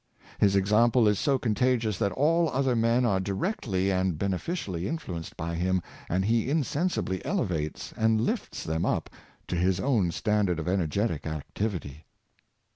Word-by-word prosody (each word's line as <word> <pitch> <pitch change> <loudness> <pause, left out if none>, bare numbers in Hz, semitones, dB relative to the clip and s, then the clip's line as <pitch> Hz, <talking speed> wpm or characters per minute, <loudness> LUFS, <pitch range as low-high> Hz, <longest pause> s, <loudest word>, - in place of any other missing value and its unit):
His 100 -1 +4
example 110 +4 +4
is 105 -2 +2
so 140 -2 +2
contagious 120 -2 +1
that 100 - +1
all 165 +4 +3
other 135 -2 +1
men 115 +2 +3
are 100 -5 +2
directly 100 - -1
and 95 -3 0
beneficially 95 - -2
influ 155 - -4
enced 80 - -9
by 85 +1 -3
him, 90 +2 +1 0.3
and 95 +2 +1
he 115 +3 +1
insensibly 150 - -1
elevates 80 -4 -2
and 110 0 +2
lifts 110 - -2
them 80 +1 -1
up - - -1 0.4
to - - -2
his 90 +1 +1
own 115 -10 +2
standard 105 -1 +1
of 80 - -4
energetic 90 -1 0
activity. 80 -1 -4
100 Hz, 150 wpm, -28 LUFS, 90-120 Hz, 0.4 s, His